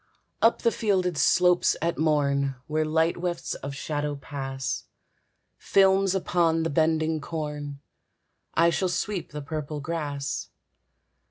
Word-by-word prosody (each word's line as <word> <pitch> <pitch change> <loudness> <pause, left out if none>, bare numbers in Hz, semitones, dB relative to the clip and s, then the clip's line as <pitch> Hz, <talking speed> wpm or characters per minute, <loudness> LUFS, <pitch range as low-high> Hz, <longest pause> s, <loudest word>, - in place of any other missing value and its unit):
Up 230 - +3
the 230 - +4
fielded 185 -6 +1
slopes 180 +5 +4
at 170 +1 -1
morn, 140 -3 +2
Where 155 0 0
light 160 +2 +1
wefts 175 -1 -3
of 140 0 -6
shadow 145 +1 -2
pass, 135 -2 -4 0.7
Films 195 0 +3
upon 170 -3 +2
the 165 - -1
bending 160 +1 +1
corn, 150 -3 -5 0.7
I 170 +1 +5
shall 185 +2 0
sweep 185 +1 -2
the 150 -1 -6
purple 150 0 -4
grass. 145 -2 -3
160 Hz, 120 wpm, -26 LUFS, 145-175 Hz, 0.7 s, I